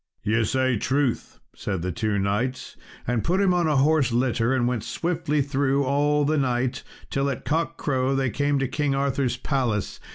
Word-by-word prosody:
"Ye 110 +2 +2
say 130 +1 +1
truth," 135 +2 -1 0.2
said 95 -5 -3
the 90 - -1
two 105 +4 -1
knights, 105 +7 -2 0.3
and 120 -2 0
put 180 +3 +1
him 195 -2 +3
in 175 -2 +2
a 150 - +2
horse 140 -1 +3
litter, 120 -1 +1
and 130 -2 +2
went 120 -4 -1
swiftly 165 -2 -1
through 140 0 +1
all 145 +2 +2
the 155 +1 +1
night, 125 -1 0 0.3
till 135 +1 0
at 135 - -5
cock 165 +3 -1
crow 130 -1 0
they 135 -2 0
came 145 +2 +1
to 135 -1 0
King 145 +1 -1
Arthur's 135 -2 0
palace. 125 -7 -1
135 Hz, 185 wpm, -24 LUFS, 120-145 Hz, 0.3 s, him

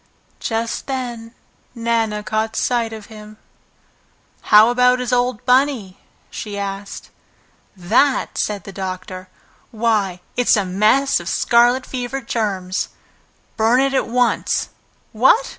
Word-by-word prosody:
Just 225 0 -3
then 240 -3 -5 0.4
Nana 230 -2 -1
caught 220 +1 -2
sight 235 -2 0
of 220 -2 -8
him. 215 -1 -12 1.1
"How 215 +2 +8
about 250 +1 +4
his 250 -1 -3
old 245 -1 0
Bunny?" 250 -7 +1 0.3
she 205 -2 -6
asked. 200 0 -6 0.7
"That?" 255 +10 +1
said 205 -3 -2
the 195 - -9
doctor. 185 -1 -6 0.4
"Why, 215 -6 0
it's 245 -2 +3
a 205 - 0
mass 215 +9 +2
of 170 -1 -6
scarlet 240 +2 +3
fever 255 +1 -4
germs! 200 -6 -2 0.7
Burn 225 +3 +3
it 275 0 +1
at 270 - +1
once. 245 +1 0 0.4
What? 265 - +3
225 Hz, 120 wpm, -19 LUFS, 205-250 Hz, 1.1 s, How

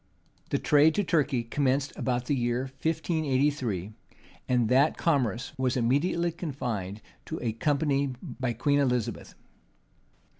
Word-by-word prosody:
The - - +1
trade 150 +2 +4
to 205 - +2
Turkey 145 -8 +1
commenced 135 +3 0
about 125 -1 -1
the 145 - +1
year 120 -1 0
1583; 135 - -1 0.6
and 125 -3 +3
that 135 +6 +3
commerce 130 - 0
was 130 -1 +1
immediately 150 +8 +1
confined 120 - -4 0.2
to 160 - -4
a 115 -3 -2
company 140 +1 0
by 130 -2 -4
Queen 145 +5 +1
Elizabeth. 125 -5 -1
135 Hz, 120 wpm, -28 LUFS, 120-150 Hz, 0.6 s, trade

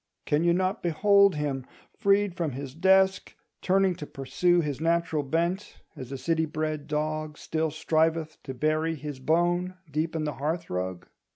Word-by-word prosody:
Can 150 +2 +1
you 170 - +4
not 185 +4 0
behold 200 +3 +4
him, 145 -3 -2 0.3
freed 200 -3 +2
from 165 -6 -2
his 135 0 -6
desk, 190 +3 +3 0.3
turning 190 0 +3
to 150 -4 -7
pursue 175 +6 +1
his 145 -2 -3
natural 165 -2 +1
bent, 170 +7 -2 0.2
as 130 0 -8
a 135 - -4
city 160 +3 0
bred 155 -1 -3
dog 155 0 -2
still 160 0 -1
striveth 160 +1 0
to 130 -2 -7
bury 155 +4 0
his 145 -2 -7
bone 175 +5 +1 0.2
deep 155 +3 -1
in 160 - -1
the 150 -1 -2
hearth 165 +3 -2
rug? 90 0 -3
160 Hz, 165 wpm, -27 LUFS, 150-175 Hz, 0.3 s, you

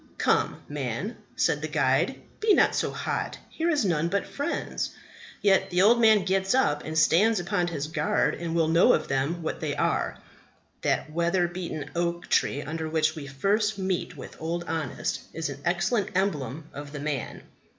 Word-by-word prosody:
Come, - - +1
man, - - -3 0.2
said - - +1
the - - -2
guide, - - +1 0.2
be 430 -2 +4
not - - +4
so - - 0
hot; - - -3
here 330 +1 -1
is 295 -9 +2
none 165 -3 +1
but 200 +3 0
friends! 285 - -3 0.5
Yet 195 -2 +4
the 180 +1 +3
old 235 +3 +5
man 215 -4 +5
gets 195 +3 +1
up 150 - +2
and 155 0 -4
stands 200 +7 +4
upon 175 0 0
his 155 -4 -3
guard, 155 -1 +1
and 170 -1 -4
will 165 -2 +3
know 165 +2 +5
of 155 - 0
them 140 +6 -1
what 160 - -3
they - - -2
are." - - 0 0.6
That 155 - 0
weather 170 +2 +1
beaten 170 -4 -5
oak 170 0 -2
tree 145 - +2
under 160 +2 -4
which 155 0 +1
we 145 -3 -7
first 205 +9 +1
meet 190 -2 -2
with - - -10
Old 170 +2 -2
Honest 160 -5 -3
is 165 -2 -3
an 140 0 -7
excellent 180 +5 +1
emblem 155 - -1
of 145 +1 -8
the 145 - -5
man. 145 -3 -4
170 Hz, 180 wpm, -27 LUFS, 155-195 Hz, 0.6 s, old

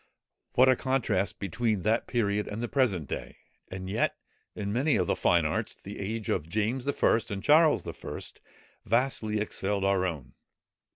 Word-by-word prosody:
What 130 +1 +6
a 130 - +6
contrast 120 -8 0
between 100 +1 -1
that 110 +2 +1
period 105 -3 0
and 110 +3 -4
the - - -1
present 105 - +1
day! - - -6 0.3
And 95 0 -6
yet, 105 +4 0 0.4
in 100 -1 -3
many 140 +6 +2
of 90 - +2
the - - +1
fine - - +3
arts, - - -1
the 100 - -8
age 110 +2 -3
of 80 -3 -1
James 110 +7 -1
I. 140 - +2 0.4
and 100 -2 -4
Charles 155 +3 +5
I. - - -6 0.6
vastly 115 -2 +1
excelled 100 -1 -1
our 100 -1 +2
own. 70 -7 -6
105 Hz, 165 wpm, -28 LUFS, 95-120 Hz, 0.6 s, What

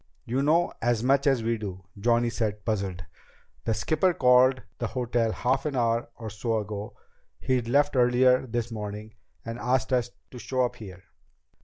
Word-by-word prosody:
"You 130 +4 -1
know 160 +5 +2
as 120 -1 +1
much 135 +3 +3
as 135 -4 +2
we 115 0 0
do," 95 -3 -6
Johnny 120 +3 +1
said, 105 -3 -3
puzzled. 95 -5 -2 0.6
"The 115 - +1
skipper 155 - +1
called 125 -1 +4 0.2
the 115 - -1
hotel 120 -2 0
half 130 +6 0
an 145 - -3
hour 115 -1 +1
or 110 -3 -7
so 110 +3 -1
ago 105 0 -5 0.4
he'd 125 -3 -1
left 145 +3 +2
earlier 125 +1 +4
this 120 0 -3
morning 105 0 -6 0.3
and 115 +1 -5
asked 125 +1 0
us 125 -1 +1 0.2
to 125 - -9
show 130 +1 0
up 120 - -5
here. 95 -4 -10
120 Hz, 170 wpm, -27 LUFS, 110-130 Hz, 0.6 s, called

